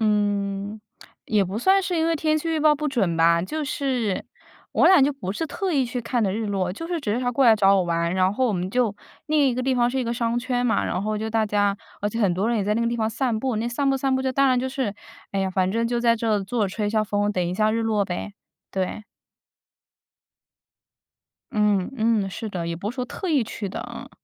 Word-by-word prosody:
嗯， 205 -1 0 0.5
也 210 -3 +2
不 190 +4 -4
算 385 +9 +4
是 355 -1 -1
因 325 0 +2
为 330 0 +1
天 310 +1 +1
气 330 - -4
预 325 -1 0
报 305 0 +5
不 300 +1 -2
准 200 - 0
吧， 170 +1 +4
就 305 +10 -3
是 255 -8 -1 0.5
我 - - +4
俩 375 -7 +7
就 285 +2 +3
不 195 -9 -5
是 325 +10 -3
特 375 +4 -3
意 275 -4 +2
去 245 0 -4
看 235 +1 -1
的 195 -3 +1
日 220 +2 -2
落， 190 -3 -1
就 330 - -6
是 345 -1 -2
只 215 -8 -1
是 235 - 0
他 245 -1 0
过 260 +3 +2
来 230 -2 +7
找 200 -2 +4
我 190 - +3
玩， 170 0 0
然 185 0 +2
后 255 +5 +1
我 230 - +1
们 180 -1 -2
就 240 -2 +1 0.3
另 300 -2 +3
一 250 - 0
个 255 - -2
地 260 0 +1
方 240 -1 +2
是 265 - -2
一 255 - 0
个 235 - -1
商 235 0 0
圈 245 0 -1
嘛， 225 - +1
然 185 - -2
后 215 +1 -1
就 220 +1 -3
大 220 0 +1
家 205 -1 +1 0.2
而 205 - 0
且 225 - -4
很 200 -6 +3
多 190 +5 0
人 235 - +1
也 200 - 0
在 210 +1 +1
那 230 - 0
个 235 - +1
地 235 - -1
方 220 -1 0
散 230 0 -1
步， 255 0 -1
那 225 +2 -1
散 275 +4 0
步 270 - +2
散 270 0 0
步 260 - 0
当 275 +1 +3
然 255 -1 +3
就 260 +1 -1
是 255 -6 -2 0.4
哎 195 - 0
呀， 190 -1 0
反 185 0 +1
正 230 +3 0
就 240 0 -1
在 235 -1 +3
这 225 0 -1
儿 210 -2 +1
坐 220 0 0
着 - - -4
吹 210 -2 -1
一 - - -1
下 215 0 +1
风， 205 0 0
等 180 -3 0
一 175 - -2
下 215 +2 +2
日 225 +1 0
落 215 -2 +1
呗， 185 +2 -5 0.4
对。 190 +2 -3 2.5
嗯 210 -2 +2
嗯， 220 -4 +1
是 220 +4 -5
的， 180 -4 -4
也 170 0 -3
不 200 +5 -4
是 - - -10
说 250 -1 -2
特 370 +9 -6
意 295 -6 +3
去 210 -2 -5
的， 190 - -5
嗯。 - - -9
225 Hz, 285 characters per minute, -24 LUFS, 200-255 Hz, 2.5 s, 俩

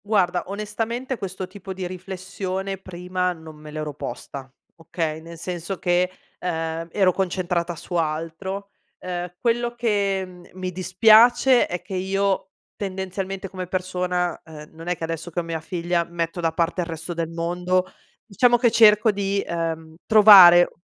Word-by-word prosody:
Guarda, 185 -4 +1
onestamente 225 +5 -3
questo 190 -1 -5
tipo 190 0 -9
di 185 0 -5
riflessione 190 +1 -5
prima 180 0 -3
non 160 -2 -12
me 150 0 -12
l'ero 155 -1 -5
posta, 135 0 -7 0.3
okay, 165 -1 -3
nel 165 +1 -11
senso 175 +2 -5
che, 180 +1 +1 0.3
ehm, 165 -1 -3
ero 190 -1 +3
concentrata 180 -2 -1
su 170 +2 -10
altro. 165 +5 -3 0.3
Ehm, 180 -1 -5
quello 240 0 0
che 195 -5 -1
mi 185 0 -4
dispiace 220 +8 +5
è 175 0 -5
che 190 - -9
io 195 +1 0 0.3
tendenzialmente 190 0 -4
come 185 -1 -6
persona, 180 -1 -2
ehm, 155 -2 -12
non 165 +1 -11
è 180 -1 -1
che - - -8
adesso 165 +1 -4
che 175 - -3
ho - - -2
mia 165 -1 -4
figlia 175 +1 -1
metto 170 +1 -4
da 165 -1 +1
parte 170 +2 0
il 170 - -4
resto 165 +1 -6
del 165 -1 -3
mondo, 175 +2 0 0.4
diciamo 240 +3 +3
che 240 -1 +3
cerco 215 0 +6
di, 200 0 -1
ehm, 165 -1 -4
trovare, 195 -5 +9
180 Hz, 150 wpm, -23 LUFS, 170-195 Hz, 0.4 s, trovare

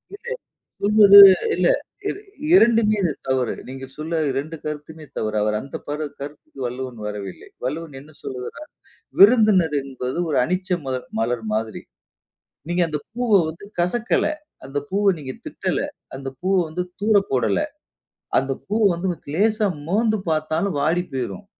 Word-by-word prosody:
இல்ல. 465 +3 -14 0.5
சொல்வது 200 -1 +8 0.4
இல்ல. - - +2 0.4
இர - - -3 0.4
இரண்டுமே 225 - +5
இது 175 -4 +1 0.2
தவறு. 130 -3 +1
நீங்க 135 +1 -7
சொன்ன 160 +2 -2
2 140 +5 -3
கருத்துமே 155 +1 -6
தவறு. 110 0 -2
அவர் 105 0 0
அந்த 135 - -7
பாட 145 +1 -3
அந்த 145 - -10
கருத்துக்கு 145 -1 -10
வள்ளுவன் 125 0 -5
வரவில்லை. 100 -3 -7 0.2
வள்ளுவன் 155 +3 -4
என்ன 150 +3 -15
சொல்லுகிறார்? 130 - -7 0.5
விருந்தினர் 200 -7 +6
என்பது 130 +1 -5
ஒரு 145 - +2
அனிச்ச 185 +5 -2 0.2
மலர் 130 -1 -3
மலர் 115 0 -1
மாதிரி. 110 0 -3 0.9
நீங்க 175 +1 +1
அந்த 150 -2 -3
பூவ 245 +1 -2 0.2
வந்து 165 +5 -10
கசக்கல. 215 +7 +1 0.4
அந்த 135 +2 -5
பூவ 200 +2 0
நீங்க 130 -3 -6
திட்டல. - - -2 0.4
அந்த 135 0 -5
பூ 185 - -1 0.2
வந்து 170 +3 -3 0.2
தூர 215 +1 +3 0.2
போடல. 120 -7 +1 0.8
அந்த 135 +1 -3 0.2
பூ 210 +2 0 0.2
வந்து 170 +3 -3 0.3
லேசா 215 +3 +2 0.2
மோந்து 215 +2 +2
பாத்தாலும் 160 +3 0
வாடி 165 +4 +1
போயிரும். 120 -8 -4
155 Hz, 140 wpm, -22 LUFS, 130-200 Hz, 0.9 s, சொல்வது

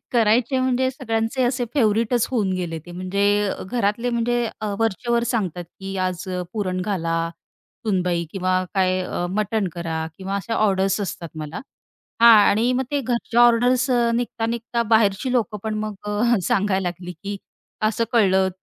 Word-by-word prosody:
करायचे. 235 +3 +3
म्हणजे 260 0 +1
सगळ्यांचे 230 -1 -1
असे 245 0 0
फेवरटच 230 -1 +2
होऊन 210 -7 0
गेले 170 -3 -3
ते. 175 - -9
म्हणजे 200 +3 +1 0.2
घरातले 235 0 0
म्हणजे 240 +1 0 0.2
अ, 210 -2 -2
वरचे 225 +2 -1
वर 235 0 +3
सांगतात, 180 -6 -2 0.2
की 195 0 -5
"आज 185 0 -2 0.3
पुरण 185 -4 -2
घाला 175 -4 -1 0.7
सुनबाई 180 -4 +1
किंवा 185 -1 0
काय 185 -1 +2
अ, 175 -1 -3
मटण 210 0 0
करा 160 -2 -3
किंवा 195 +1 -3
अशा 225 +3 -3
ऑर्डर्स 195 -2 +2
असतात 175 -4 -4
मला." 155 +3 -6 0.6
हां, 230 -1 +9
आणि 230 +5 +2
मग 260 +1 0
ते 285 - 0
घरच्या 240 -1 0
ऑर्डर्स 250 +2 +3
अ, 240 -1 +3
निघता-निघता 235 0 -2
बाहेरची 220 +3 +2
लोकं 225 -4 0
पण 220 -1 -2
मग 215 - -4
अ, 215 +3 +2
सांगायला 195 -5 +1
लागली, 175 +1 -7
की 200 +5 -6 0.5
"असं 230 +1 +1
कळलं 190 -4 +4
210 Hz, 155 wpm, -22 LUFS, 185-235 Hz, 0.7 s, हां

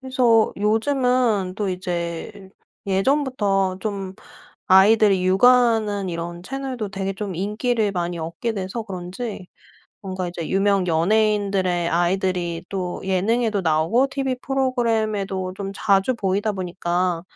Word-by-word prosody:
그래서 250 -4 +3
요즘은 225 -2 +1
또 210 -2 -1
이제 180 +2 -4 0.4
예전부터 195 -4 +1
좀 195 -3 -4 0.5
아이들이 195 0 +5
육아하는 215 -1 +3
이런 170 0 -5
채널도 260 -1 -4
되게 195 -1 -3
좀 195 -1 -5
인기를 210 +3 -1
많이 175 -1 -3
얻게 170 +8 -3
돼서 195 +2 -4
그런지 190 +1 -6 0.5
뭔가 185 -2 -4
이제 170 -2 -6
유명 195 -1 +2
연예인들의 190 0 +1
아이들이 175 -1 0
또 180 -2 -4
예능에도 205 +3 +1
나오고 165 - +2
TV 270 -2 -2
프로그램에도 220 -8 -1
좀 195 -1 -5
자주 200 +3 +2
보이다 205 0 -1
보니까 180 -2 -2
195 Hz, 285 characters per minute, -22 LUFS, 185-225 Hz, 0.5 s, 아이들이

